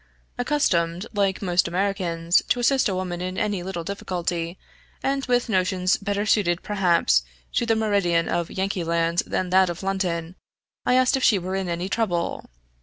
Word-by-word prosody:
Accustomed, 185 - +1
like 200 -1 0
most 180 -2 +2
Americans, 175 -2 +1
to 245 - +2
assist 255 -1 +3
a 190 - -1
woman 180 -1 -3
in 185 +1 -4
any 205 -3 -1
little 175 -2 -4
difficulty, 175 -2 -3 0.5
and 275 0 0
with 245 -1 +2
notions 185 -2 +1
better 205 +1 -2
suited 185 -5 +2
perhaps 175 - +2 0.3
to 235 - 0
the 225 - +3
meridian 200 -6 +1
of 170 -1 -1
Yankee 190 -1 -2
land 170 +1 +1
than 185 -1 -2
that 190 0 +5
of 175 +2 -5
London, 180 -3 -2 0.5
I 250 - +4
asked 255 +1 +4
if 265 - -3
she 210 - +5
were 185 +1 -4
in 190 -2 -2
any 170 +2 -2
trouble. 190 -5 -2
185 Hz, 170 wpm, -24 LUFS, 175-205 Hz, 0.5 s, that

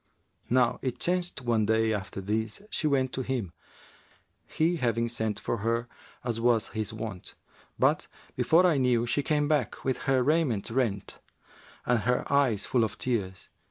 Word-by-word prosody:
Now 125 -1 +3
it 130 -2 -2
chanced 175 -5 -1
one 115 -3 +1
day, 110 0 +2
after 100 -1 -4
this, 110 - -2
she 155 - 0
went 130 -3 +1
to 130 - -1
him, 120 -9 -3 0.9
he 170 +2 +1
having 115 -4 0
sent 110 -3 -2
for 115 - -2
her, 115 +2 -1 0.4
as 115 -2 -2
was 115 -2 +2
his 110 0 -3
wont; 110 -4 -7 0.4
but, - - +2 0.3
before 170 +3 +4
I 170 -5 +4
knew, 125 -3 +2
she 130 +4 0
came 150 0 +1
back, 145 -7 -1
with 130 - -1
her 130 -2 +3
raiment 140 -9 +1
rent 115 -6 -1 0.7
and 125 -1 +2
her 125 +4 +1
eyes 125 -8 +3
full 120 -3 +2
of 110 - -3
tears. 100 -7 -3
120 Hz, 160 wpm, -28 LUFS, 110-135 Hz, 0.9 s, before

